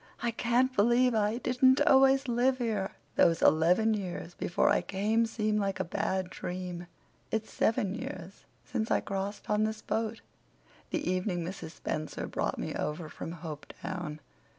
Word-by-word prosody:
I 235 - +1
can't 245 +3 +1
believe 240 +4 +4
I 215 +1 +1
didn't 260 +1 +4
always 270 0 +5
live 250 +2 +2
here. 220 -6 -1 0.2
Those 165 -1 +4
eleven 180 +8 +4
years 180 -4 -4
before 175 - 0
I - - +3
came 215 +4 +1
seem 215 -1 0
like 195 -2 -1
a - - +1
bad 185 +2 -2
dream. 180 -1 -5 0.4
It's 220 0 -3
seven 205 -3 +1
years 260 +6 -7 0.2
since 220 0 -2
I - - +3
crossed 195 +1 -4
on 210 0 +2
this 215 0 -2
boat—the 225 +7 -5
evening 180 -1 0
Mrs. 170 -3 -6
Spencer 155 0 -4
brought - - -2
me - - -3
over 155 +1 -3
from 165 - -7
Hopetown. 155 +1 -6
210 Hz, 150 wpm, -30 LUFS, 180-235 Hz, 0.4 s, always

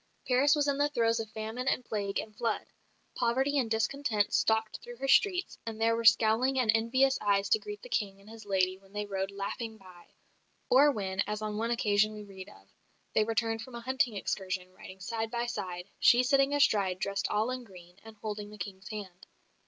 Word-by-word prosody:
Paris 270 +3 +4
was 290 -1 +1
in 280 0 0
the 290 0 +3
throes 230 -4 +1
of 220 -1 -4
famine 220 +4 -5
and 255 -2 +1
plague 200 -2 -2
and 215 -1 -5
flood. 230 0 -1 0.5
Poverty 265 +4 +1
and 240 -4 -1
discontent 220 -1 0
stalked 220 -1 +1
through 240 - -10
her 270 +3 -4
streets, 365 +6 +3
and 225 -1 -6
there 230 0 +3
were 230 0 -3
scowling 225 +4 +4
and 245 -4 +4
envious 260 +4 +2
eyes 200 -1 +2
to 440 - +4
greet 415 -1 -8
the - - -8
King 195 - -2
and 200 - -19
his 225 0 -11
lady 190 -2 0
when 195 0 -22
they 210 0 -3
rode 195 -1 -3
laughing 210 +3 -5
by; 180 -3 -16 0.6
or 285 +3 +7
when, 195 -6 -4
as 210 +1 -3
on 210 -1 -3
one 225 +2 -1
occasion 215 -3 +2
we 210 0 -8
read 195 -1 -10
of, - - -18 0.5
they 215 - +4
returned 225 0 -1
from 250 +1 -9
a 235 - -6
hunting 260 -1 0
excursion, 185 -2 -3
riding 185 +1 -12
side 225 +3 -3
by 235 +1 -2
side, 180 -6 -5
"she 245 +1 +6
sitting 275 +1 +3
astride 205 -10 +2
dressed 200 +1 -2
all 215 +4 +1
in 255 -1 -4
green" 180 -4 -15
and 225 0 -12
holding 210 -1 -4
the 210 - -11
King's 195 -1 -7
hand. 195 -4 -8
220 Hz, 205 wpm, -30 LUFS, 200-250 Hz, 0.6 s, or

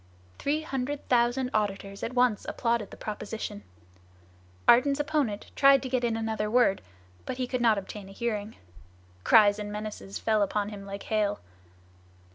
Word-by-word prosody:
Three 305 +2 0
hundred 275 0 -4
thousand 245 +1 +2
auditors 200 -1 -2
at 250 - -4
once 245 -4 +3
applauded 230 -4 -1
the - - -12
proposition. 210 -1 -5 1.1
Ardan's 275 +4 +5
opponent 290 -8 -1
tried 275 0 +6
to 260 - -4
get 250 -1 0
in 230 -2 0
another 220 -1 -2
word, 235 -4 +3 0.5
but - - -3
he 255 - -1
could 250 0 -2
not 225 -3 +4
obtain 200 0 -7
a - - -11
hearing. 215 0 -3 0.7
Cries 210 -1 +6
and 205 0 -5
menaces 210 -2 -6
fell 220 -2 +1
upon 205 +1 0
him 200 -2 -9
like 200 0 -6
hail. 210 -2 0
220 Hz, 155 wpm, -28 LUFS, 205-250 Hz, 1.1 s, tried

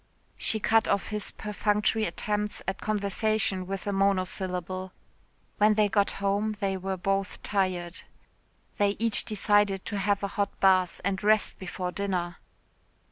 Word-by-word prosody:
She 220 - -1
cut 225 +1 +3
off 200 - 0
his 210 -1 -1
perfunctory 210 +1 0
attempts 210 0 -2
at 195 - -2
conversation 205 -2 0
with 195 0 -4
a 205 - -1
monosyllable. 185 -1 -1 0.7
When 210 +1 +5
they 210 -1 +3
got 200 0 +2
home 205 +2 0
they 195 -2 0
were 190 0 -3
both 195 +2 -1
tired. 185 -3 -1 0.8
They 205 0 +3
each 230 -1 +1
decided 205 -2 +2
to 205 - -3
have 200 +1 +1
a - - +1
hot 200 0 -2
bath 185 -2 +3
and 195 -1 -1
rest 215 0 +2
before 180 -1 -4
dinner. 180 -3 -2
200 Hz, 140 wpm, -28 LUFS, 190-210 Hz, 0.8 s, When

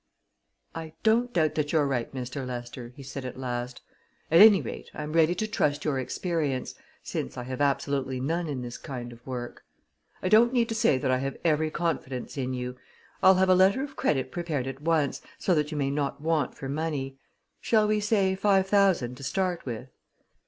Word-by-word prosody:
"I 160 -1 -7
don't 235 +3 +3
doubt 160 -6 +2
that 150 -1 -1
you're 155 -3 +3
right, 130 -4 -1
Mr. 130 +1 -5
Lester," 120 -1 -6
he 140 - -10
said 135 0 -6
at 125 -1 -6
last. 125 -1 -4 0.5
"At 165 +3 +7
any 210 -2 +9
rate, 130 - -7
I'm 150 +1 -5
ready 165 +1 +4
to 215 - -1
trust 145 -8 0
your 140 -4 +1
experience 145 -1 -2 0.3
since 65 - -4
I 125 - -4
have 130 +2 -5
absolutely 135 -2 0
none 165 +6 -1
in 135 -4 -3
this 120 0 -7
kind 120 -3 -6
of 120 +1 -17
work. 125 -2 -6 0.6
I - - +1
don't 225 +5 +5
need 235 -2 +2
to - - -1
say 215 -11 +3
that 130 -1 0
I 130 - +2
have 135 +1 -3
every 155 -1 +2
confidence 155 -7 -3
in 130 -2 -2
you. 125 0 -5 0.4
I'll 190 0 +7
have 190 0 +3
a - - +7
letter 190 +8 +4
of 275 -1 -7
credit 130 -3 0
prepared 160 -7 -2
at 135 +1 -6
once, 155 -3 +1 0.2
so 185 - +1
that 150 -2 +1
you 155 - -3
may 140 -1 0
not 140 -1 -2
want 155 -3 0
for 135 - -6
money 140 -2 -3 0.4
shall 215 -2 +3
we 215 0 +2
say 205 -3 +2
five 195 0 +3
thousand 190 -11 +2
to 140 - -10
start 180 +2 -1
with?" 120 +2 -5
145 Hz, 200 wpm, -27 LUFS, 130-180 Hz, 0.6 s, any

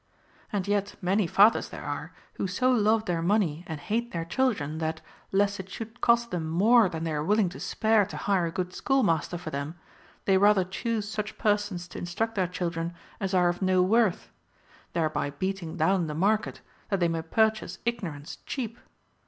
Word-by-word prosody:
And 200 -2 -2
yet 205 0 0
many 190 +1 +1
fathers 205 +6 +4
there - - -8
are, - - -4 0.2
who - - -2
so 250 +8 +2
love 220 -2 +3
their 175 -4 -1
money 175 -4 +1
and 160 -2 -5
hate 235 +8 -2
their 165 -1 -3
children, 165 - 0
that, 160 0 -2 0.3
lest 200 +1 +2
it 190 0 -7
should 225 +3 -8
cost 235 0 +3
them 165 -3 -2
more 210 +5 +5
than 165 -2 -5
they 165 -1 -2
are 150 0 -1
willing 205 +2 +2
to 175 - -10
spare 220 -1 +2
to - - -7
hire 190 -4 +1
a - - -4
good 180 +1 -3
schoolmaster 190 - +1
for 165 -2 -7
them, 140 +3 -4 0.5
they 190 -1 +4
rather 205 -1 +5
choose 210 +3 -3
such 215 0 -4
per 210 -2 +3
sons 200 -4 -6
to - - -7
instruct 220 +6 -2
their 190 -4 +1
children 170 -1 -3 0.2
as 195 -1 -1
are 180 -1 +4
of 175 +2 -3
no 185 -1 +3
worth; 215 0 +2 0.6
thereby 155 -3 0
beating 180 +2 -4
down 175 +1 +2
the 150 - -4
market, 210 +6 +1 0.3
that 195 - +1
they 175 - +3
may 165 -1 -1
purchase 220 +6 +1
ignorance 175 -11 -4
cheap. 235 -4 -4
190 Hz, 190 wpm, -27 LUFS, 170-215 Hz, 0.6 s, more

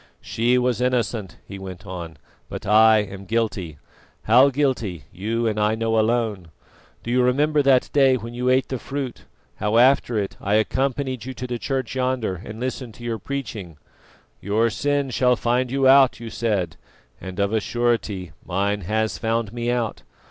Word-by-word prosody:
"She 120 +3 +1
was 125 -1 +1
innocent," 120 -7 -1
he 100 0 -9
went 95 +1 -9
on, 85 -4 -7 0.3
"but - - -7
I 110 +1 +6
am 100 -1 -9
guilty. 100 -8 -2 0.5
How 125 +5 +6
guilty 125 - -1
you 115 +5 -2
and 105 -1 0
I 105 +1 +2
know 115 0 +1
alone. 110 -5 0 0.6
Do 120 - -4
you 125 +1 +3
remember 145 +4 +2
that 135 -2 +3
day 135 -2 +5
when 115 +1 -8
you 125 +1 -1
ate 130 +1 +2
the 130 - -3
fruit, 135 -1 -5 0.3
how 105 +2 0
after 125 -2 +4
it 100 -2 -3
I 100 +2 +1
accompanied 130 +2 0
you 130 0 -6
to 125 - -5
the 120 -1 -4
church 130 +3 -2
yonder 125 -7 -1
and 110 +1 -8
listened 125 -2 -4
to 120 - -13
your 115 -2 -3
preaching? 105 - -6 0.6
'Your 110 +4 +1
sin 140 +3 -1
shall 125 +1 +3
find 120 +2 0
you 135 +1 +2
out,' 135 -1 +6
you 115 -1 -7
said, 100 -8 -1 0.4
and 95 +1 -7
of 100 +1 +1
a 110 - +3
surety 110 -6 -1
mine 100 +3 -1
has 110 +4 -1
found 115 -1 -1
me 120 0 -2
out. 120 - -1
115 Hz, 175 wpm, -23 LUFS, 105-125 Hz, 0.6 s, I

